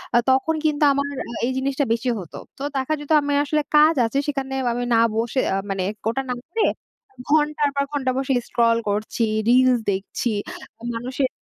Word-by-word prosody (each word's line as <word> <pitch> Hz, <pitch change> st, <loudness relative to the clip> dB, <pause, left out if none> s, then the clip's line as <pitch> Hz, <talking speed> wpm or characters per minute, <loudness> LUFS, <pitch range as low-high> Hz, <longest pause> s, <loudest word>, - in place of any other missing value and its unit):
আ -, -, +7 dB
তখন 265 Hz, +5 st, +2 dB
কিন্তু 300 Hz, -1 st, +1 dB
আমার 280 Hz, +1 st, 0 dB, 0.2 s
আ -, -, -6 dB
এই 255 Hz, -, 0 dB
জিনিসটা 275 Hz, +1 st, 0 dB
বেশি 235 Hz, +2 st, -1 dB
হত। 175 Hz, -5 st, -10 dB, 0.2 s
তো 270 Hz, -, -6 dB
দেখা 265 Hz, +3 st, 0 dB
যেত 295 Hz, +1 st, -8 dB
আমার 285 Hz, 0 st, -1 dB
আসলে 300 Hz, +1 st, +1 dB
কাজ 305 Hz, +2 st, +6 dB
আছে, 275 Hz, +5 st, -1 dB
সেখানে 270 Hz, -2 st, -3 dB, 0.2 s
আমি 245 Hz, +1 st, -2 dB
না -, -, +5 dB, 0.2 s
বসে, 230 Hz, +3 st, 0 dB
আ -, -, +1 dB
মানে 195 Hz, -1 st, -1 dB, 0.3 s
ওটা 235 Hz, +4 st, -1 dB
না -, -, +1 dB
করে, 425 Hz, +7 st, -1 dB, 0.7 s
ঘন্টার 300 Hz, -1 st, +2 dB
পর 280 Hz, -, +2 dB
ঘন্টা 270 Hz, -3 st, 0 dB
বসে 270 Hz, 0 st, 0 dB
স্ক্রল 230 Hz, -1 st, +2 dB
করছি, 210 Hz, +3 st, -2 dB, 0.3 s
রিলস 255 Hz, 0 st, +5 dB
দেখছি, 195 Hz, +5 st, -3 dB, 0.7 s
মানুষের 255 Hz, +3 st, -2 dB
265 Hz, 180 wpm, -22 LUFS, 235-290 Hz, 0.7 s, আ